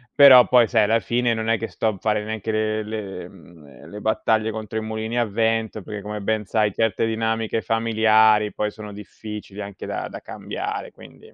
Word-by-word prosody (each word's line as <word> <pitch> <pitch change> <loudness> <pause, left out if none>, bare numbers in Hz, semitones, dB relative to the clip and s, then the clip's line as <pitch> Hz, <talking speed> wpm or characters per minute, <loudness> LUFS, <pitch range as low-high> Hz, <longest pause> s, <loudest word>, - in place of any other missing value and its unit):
però 135 -3 +9
poi 120 -3 +5
sai 110 -3 +3
alla 115 +2 +3
fine 120 +1 0
non 110 0 -3
è 115 - +3
che 115 - -4
sto - - -2
a 110 -3 -1
fare 105 -1 0
neanche 110 0 -4
le 110 0 -1
le 100 -4 -6
mhmm, 80 -7 -16
le 105 +1 -9
battaglie 110 0 +1
contro 110 0 -6
i - - -5
mulini 110 +2 -4
a 120 - +2
vento, 110 0 -1
perché 105 +1 -7
come 105 0 -5
ben 105 +1 -1
sai 105 +1 +1
certe 115 -1 0
dinamiche 110 0 -1
familiari 110 -1 +3
poi 105 - -1
sono 105 -1 -10
difficili 105 0 -9
anche 100 -1 -8
da - - -4
da - - -8
cambiare - - -6
quindi. - - -16
110 Hz, 195 wpm, -22 LUFS, 105-115 Hz, -, però